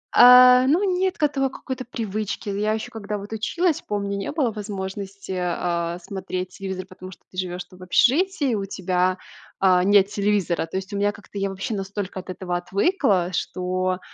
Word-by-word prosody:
А, 250 +1 +9
ну 330 +8 +3
нет 375 0 +1
к 315 - -3
этому 275 -2 +2
какой-то 260 0 -6
привычки. 215 -3 -4
Я 210 +2 0
еще 220 0 -4
когда 210 -1 -4
вот 205 +2 -8
училась, 320 +10 0
помню, 200 -1 -3
не 195 0 -3
было 285 -6 0
возможности, 200 -2 -6
э, 175 -1 -1
смотреть 185 -1 -4
телевизор, 190 -1 -5
потому 185 0 -11
что 180 - -15
ты 185 - -14
живёшь, 180 -1 -3
там, 180 +1 -18
в - - -10
общежитии, 280 - +2
у 200 -2 -1
тебя, 185 -1 0 0.4
а, 185 -2 +4
нет 200 0 +5
телевизора. 200 -5 0
То 165 - -4
есть 190 +2 -6
у - - -2
меня 205 +1 +2
как-то 205 -1 -9
я 195 0 0
вообще 195 +5 -4
настолько 195 -1 -4
от 185 - -11
этого 180 -1 -3
отвыкла, 195 - +1
что, 185 +1 -1
200 Hz, 185 wpm, -23 LUFS, 185-225 Hz, 0.4 s, А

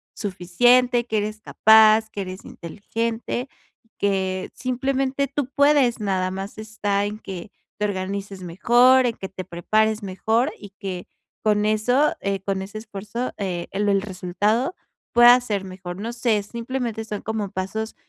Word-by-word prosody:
suficiente, 240 +6 +2
que 220 -2 -1
eres 215 +1 -3
capaz, 220 0 +5
que 200 - -4
eres 185 0 -7
inteligente, 230 - -4 0.5
que 190 -2 0
simplemente 265 +2 -1
tú 275 -1 -3
puedes. 280 -4 +4
Nada 190 -3 0
más 195 +3 -6
está, 210 -2 -1
en 210 +1 -5
que 190 -2 -8 0.3
te 210 - +1
organices 195 0 -4
mejor, 245 +9 +4
en 230 - -2
que 190 - -6
te 190 -1 -7
prepares 215 +5 +1
mejor 220 +7 0
y 205 - -10
que 185 -2 -5 0.4
con 210 -1 +2
eso, 245 +7 +2
eh, 195 0 -1
con 195 0 -2
ese 200 +3 -7
esfuerzo, 215 +3 -5
eh, 180 -4 -3
el 205 +1 0
el 195 -1 +3
resultado 205 - -1 0.4
pueda 240 +1 +8
ser 210 -5 -2
mejor. 185 -1 -7
No 230 +2 -4
sé, 235 -3 +1
simplemente 235 +1 -4
son 210 -2 -5
como 215 -3 -3
pasos 215 +4 -4
215 Hz, 150 wpm, -23 LUFS, 195-240 Hz, 0.5 s, pueda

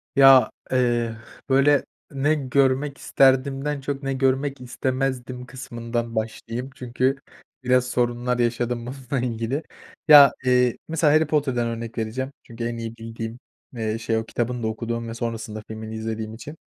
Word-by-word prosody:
Ya, 135 -1 +8 0.2
eee, 120 -3 +1 0.3
böyle, 140 +2 +4 0.3
ne 140 +2 +1
görmek 135 0 +1
isterdimden 135 +2 +2
çok 140 0 -4
ne 135 0 -1
görmek 135 +1 0
istemezdim 125 0 -3
kısmından 120 -2 -5
başlayayım. 115 +3 -4
Çünkü 130 +2 0 0.5
biraz 125 0 +3
sorunlar 125 0 0
yaşadım 120 0 0
bununla 130 0 -3
ilgili. 120 +5 -2 0.4
Ya, 145 -2 +10
eee, 125 -1 +3
mesela 160 -2 +2
Harry 155 0 +4
Potter'dan 135 -6 +1
örnek 115 0 -5
vereceğim. 120 +5 -3
Çünkü 115 0 -8
en 115 0 -2
iyi 115 0 -6
bildiğim, 115 +1 -7 0.4
eee, 110 -1 -2
şey, 115 0 0
o 110 - -2
kitabını 120 +1 -2
da - - +1
okuduğum 115 +1 -3
ve 115 - -5
sonrasında 115 -2 -4
filmini 110 0 -7
izlediğim 110 0 -4
için. 145 +8 -9
125 Hz, 145 wpm, -24 LUFS, 115-135 Hz, 0.5 s, Ya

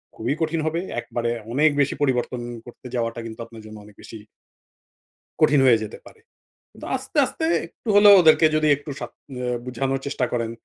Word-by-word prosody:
খুবই 120 +5 -2
কঠিন 160 0 0
হবে। 160 +2 -1 0.2
একবারে 120 0 -3 0.2
অনেক 150 +4 +4
বেশি 140 - 0
পরিবর্তন 125 -3 0 0.2
করতে 120 +1 -12
যাওয়াটা 115 -1 -2
কিন্তু 110 0 -9
আপনার 115 -1 -13
জন্য 110 0 -10
অনেক 105 -1 -17
বেশি 115 - -10 1.2
কঠিন 145 -1 +4
হয়ে 115 -3 +5
যেতে 110 0 -7
পারে। 450 - -16 0.6
তো - - -7
আস্তে, - - -7
আস্তে 320 - -4 0.2
একটু - - -20
হলে 205 +1 +7
ওদেরকে 160 -1 +5
যদি 155 0 +2
একটু 145 +2 -11
শা 120 - -5 0.6
বুঝানোর 135 +2 -2
চেষ্টা 140 -3 -1
করেন, 115 -2 -2
125 Hz, 170 wpm, -23 LUFS, 115-155 Hz, 1.2 s, হলে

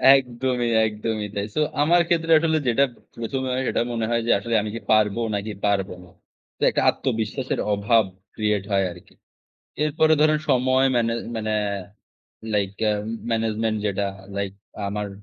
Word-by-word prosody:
একদমই, 125 -2 0 0.2
একদমই, 110 0 -3
তাই। 100 0 -2
সো 155 - +1 0.2
আমার 170 +3 +4
ক্ষেত্রে 165 -1 +1
আসলে 160 0 +2
যেটা 135 +4 +4 0.3
১ম 115 +3 -3
এ - - -2
হয় 130 - 0
সেটা - - +1
মনে 115 -1 -1
হয় 115 0 +2
যে, - - +1
আসলে 115 +3 -3
আমি 105 - -4
কি 115 - -4
পারবো 110 +1 +3
নাকি 105 +1 -3
পারবো 100 -2 +1
না। 90 - -17 0.5
তো - - -12
একটা - - 0
আত্মবিশ্বাসের 120 +2 -2
অভাব 110 +2 +3 0.3
create 105 -2 0
হয় 95 -1 +3
আরকি। 85 - -16 0.7
এরপরে 155 +1 +3
ধরেন 155 0 +4
সময় 130 +1 +3
মানে 115 -1 +2 0.2
মানে, 110 -1 -2 1.0
লাইক 100 -2 +1
এ্যা 105 -1 +3 0.4
management 110 0 0
যেটা 100 0 0 0.3
লাইক 100 -1 -2 0.3
আমার 105 0 -3
115 Hz, 160 wpm, -23 LUFS, 105-130 Hz, 1.0 s, আমার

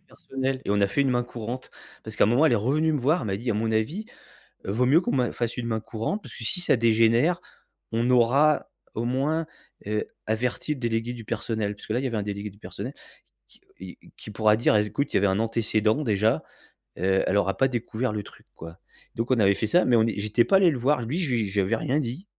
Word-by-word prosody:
personnel 135 0 -4
et - - -3
on 105 - +2
a 100 - +4
fait 100 +7 -1
une 135 -1 +2
main 120 -1 +1
courante 120 +1 -7 0.3
parce - - -7
qu'à - - +5
un - - +3
moment, 125 +8 +4
elle - - +3
est 115 - +4
revenue 150 +9 +1
me 145 - -1
voir, 150 +8 +2
elle 110 - -4
m'a 95 - -1
dit: 120 +4 -3
«À 105 - 0
mon 110 +1 -1
avis, 150 - -1 0.6
heu, 95 - -2
vaut 125 +4 +1
mieux 140 +6 +5
qu'on - - -2
ma 125 -2 +1
fasse 120 -1 -3
une 120 -1 -3
main 110 -1 -1
courante 115 - -4
parce - - -12
que - - -8
si 180 - -1
ça 175 - +3
dégénère, 115 +8 +3 0.5
on 120 +2 +1
aura 135 +5 +3 0.2
au 115 - -3
moins, 145 +6 0 0.4
heu, 105 0 -1 0.2
averti 125 +7 -1
le 135 - -10
délégué 115 0 -1
du 115 -2 -9
personnel» 110 -2 -2
puisque 105 - -9
là, 120 - +1
il - - -4
y 135 - 0
avait 115 -3 -2
un 105 - -1
délégué 100 0 -5
du 100 +1 -19
personnel - - -7 0.5
qui - - -20 0.2
qui 95 0 -10
et - - -19
qui 105 - -9
pourra 110 0 +3
dire: 120 - +3
«Bah 105 - +4
écoute, 140 +7 -3
il - - +4
y - - +4
avait 100 - +2
un 95 +1 +1
antécédent 110 +2 +1
déjà, 105 - +1 0.5
heu, 95 +2 +2
elle - - +1
aura 95 -1 +1
pas 135 - +3
découvert 120 -1 -3
le 105 -1 -3
truc - - -16
quoi». 85 +2 -11 0.4
Donc 115 +2 -2
on 125 - +3
avait 100 -1 +4
fait 110 - -2
ça, 175 +11 +4
mais 120 - +4
on 110 - +4
j'étais 105 +2 +1
pas 195 - +3
allé 180 -4 +5
le 135 - -3
voir. 130 +1 +2
Lui, 130 +10 -3
j 120 - 0
je - - -10
lui 95 - 0
avais 115 - +1
rien 135 +6 0
dit. 135 - -5
115 Hz, 260 wpm, -25 LUFS, 105-130 Hz, 0.6 s, qu'à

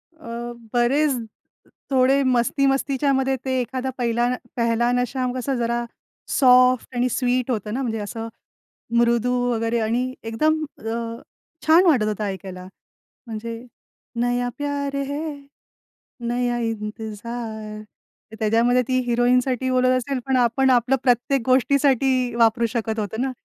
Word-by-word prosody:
अ, 320 -6 -12 0.4
बरेच 270 +4 +2 0.7
थोडे 265 +1 +4
मस्ती-मस्तीच्यामध्ये 270 +1 +1
ते 260 -1 0
एखादा 260 +1 -3
पहिला 240 -1 +1 0.3
"पेहेला 235 0 +1
नशा" 250 +1 0
कसा 260 +2 -2
जरा 235 0 -1 0.5
सॉफ्ट 255 -1 +4
आणि 245 +1 +1
स्वीट 250 +1 0
होतं 215 -2 -3
ना, 260 - -2
म्हणजे 225 -4 -2
असं 225 +2 -5 0.7
मृदू 235 +1 +3 0.2
वगैरे 230 0 0
आणि 240 +3 -1
एकदम 310 +8 +1 0.2
अ, 230 +1 -4 0.5
छान 330 +4 +6
वाटत 285 -11 +4
होतं 215 0 -2
ऐकायला. 190 -2 -6 0.6
म्हणजे 230 +1 -6 0.6
नया 245 0 0
प्यारे 280 -1 -2
है, 295 +2 -4 0.9
नया 245 0 0
इंतजार. 220 0 -5 0.6
त्याच्यामध्ये 230 +3 +3
ती 255 0 +1
हिरोईनसाठी 250 +1 +2
बोलत 255 0 +3
असेल, 260 +1 -2
पण 265 -1 +1
आपण 245 +2 +2
आपलं 250 +1 +3
प्रत्येक 250 +2 +2
गोष्टीसाठी 260 -1 +2
वापरू 235 0 +3
शकत 225 -2 -2
होतो 215 +2 -3
ना. 265 0 0
245 Hz, 120 wpm, -22 LUFS, 230-265 Hz, 0.9 s, छान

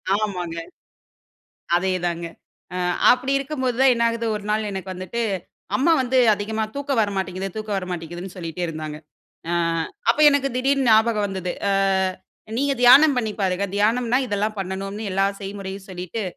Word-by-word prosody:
ஆமாங்க. 180 -5 -3 1.2
அதேதாங்க. 175 -2 -1 0.5
அ, - - -3 0.3
அப்டி 260 +2 +2
இருக்கும்போது 265 -3 -2
தான், 265 -1 +6
என்ன 235 - -1
ஆகுது 230 0 -2
ஒரு 210 - -8
நாள் 215 0 0
எனக்கு 190 -1 -5
வந்துட்டு, 185 +6 -4 0.5
அம்மா 295 +8 +3
வந்து 255 +1 +1 0.2
அதிகமா 220 +2 -2
தூக்கம் 280 -2 -2
வர 210 -2 +1
மாட்டேங்குது, 190 0 -3
தூக்கம் 215 -2 -3
வரமாட்டேங்குதுன்னு, 175 0 -6
சொல்லிகிட்டே 170 0 -5
இருந்தாங்க. 155 -2 -6 0.5
அ, - - -1 0.6
அப்ப 240 - 0
எனக்கு 280 -1 +1
திடீர்னு 270 0 +1
ஞாபகம் 220 -1 +4
வந்தது. 185 -2 -3 0.2
அ, - - +2 0.8
நீங்க 280 +1 +1
தியானம் 270 +4 +8
பண்ணி 220 -4 -1
பாருங்க, 190 0 0
தியானம்னா 235 +4 +2
இதெல்லாம் 210 0 -1
பண்ணணும்னு 195 +2 -4
எல்லா 195 +1 +2 0.2
செய்முறையும் 195 -1 -7
சொல்லிட்டு, 185 +4 -5
205 Hz, 145 wpm, -22 LUFS, 185-245 Hz, 1.2 s, தியானம்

